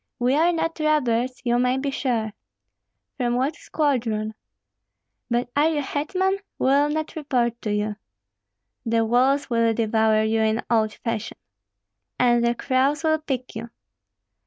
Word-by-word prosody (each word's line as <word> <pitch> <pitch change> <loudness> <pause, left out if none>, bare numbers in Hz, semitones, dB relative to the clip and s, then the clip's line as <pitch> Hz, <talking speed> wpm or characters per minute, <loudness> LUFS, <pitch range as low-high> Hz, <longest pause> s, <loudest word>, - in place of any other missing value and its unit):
"We 245 +2 +1
are 325 +4 +4
not 330 -1 -2
robbers, 255 -5 +1
you 240 0 +2
may 250 +1 +2
be 275 +1 -2
sure." 230 -6 -1 0.8
"From 240 -2 0
what 270 +5 0
squadron?" 225 -8 -1 1.0
"But 240 +1 -1
are 295 +2 +4
you 305 -2 0
hetman? 375 +8 -1 0.2
We - - -1
will 280 +2 +4
not 310 +1 -3
report 245 -6 -1
to 210 - -2
you." 210 0 -1 0.9
"The 225 0 +1
wolves 260 +4 +2
will 230 -1 +2
devour 220 -1 +2
you, 220 +1 +1
in 220 +1 +1
old 220 -2 +2
fashion." 230 -2 -4 0.8
"And 240 -1 +3
the 235 0 +2
crows 275 +5 +1
will 315 0 +2
pick 260 -6 -4
you!" 230 +2 -6
245 Hz, 145 wpm, -23 LUFS, 230-290 Hz, 1.0 s, are